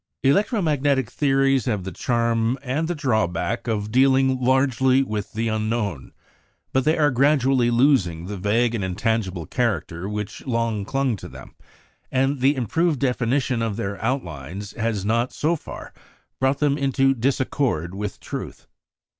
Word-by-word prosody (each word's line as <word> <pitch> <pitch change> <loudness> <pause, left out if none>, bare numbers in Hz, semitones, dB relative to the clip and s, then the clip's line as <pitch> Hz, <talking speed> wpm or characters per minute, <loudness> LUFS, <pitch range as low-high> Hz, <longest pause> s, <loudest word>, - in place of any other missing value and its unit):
Electro 200 - +2
magnetic 140 -5 +1
theories 135 -2 +2
have 105 -7 -1
the 95 - -5
charm, 115 - 0
and 145 +5 -1
the 175 - -2
drawback, 115 - -1
of 105 -2 -2
dealing 130 +1 +3
largely 130 0 +3
with 110 -5 -4
the 115 +1 -1
unknown. 110 - -2 0.6
But 130 0 +2
they 155 +1 +3
are 150 -2 +3
gradually 135 -2 +3
losing 115 - +2
the 100 +2 -5
vague 110 +5 +1
and 110 -4 -2
intangible 95 -2 -1
character 100 -6 -2
which 105 0 -5
long 115 -4 -1
clung 135 -2 0
to - - -9
them; - - -12 0.6
and 135 +1 +1
the 135 +3 +3
improved 150 +5 0
definition 125 -1 0
of 115 -3 -1
their 100 -3 -4
outlines 95 - -4
has 110 -3 -2
not, 115 +3 +1
so 160 +3 +1
far, 155 - -9 0.5
brought 135 +1 +2
them 145 -1 +1
into 135 0 +2
disaccord 125 - -1
with 100 +1 -5
truth. - - -7
120 Hz, 145 wpm, -23 LUFS, 105-135 Hz, 0.6 s, dealing